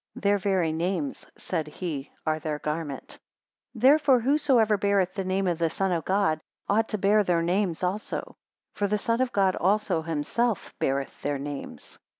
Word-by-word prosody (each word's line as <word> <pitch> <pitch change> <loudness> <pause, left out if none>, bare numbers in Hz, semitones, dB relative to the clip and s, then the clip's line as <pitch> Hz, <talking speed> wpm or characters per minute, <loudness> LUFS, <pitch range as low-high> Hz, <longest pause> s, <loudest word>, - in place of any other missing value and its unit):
Their 200 0 +2
very 185 -5 +1
names, 190 - -2
said 160 -4 -3
he, 150 -3 -5
are 155 -1 0
their 155 -1 -3
garment. 150 -2 -5 0.5
124 225 - -10
Therefore 275 -1 +6
whosoever 255 -4 +3
beareth 200 -2 +1
the 195 0 -3
name 190 +1 0
of 175 -2 0
the 165 -1 +2
Son 190 +3 -1
of 170 -2 -1
God, 185 -5 +1 0.3
ought 220 +2 +2
to 215 - -1
bear 205 +2 +4
their 175 -3 +1
names 180 0 0
also; 190 +4 -3 0.4
for 205 - 0
the 210 +1 +1
Son 230 +3 0
of 260 -1 +1
God 195 -2 +2
also 195 -3 +1
himself 165 +8 -1
beareth 135 0 -2
their 145 0 -1
names. 140 0 -8
190 Hz, 170 wpm, -27 LUFS, 160-210 Hz, 0.5 s, Therefore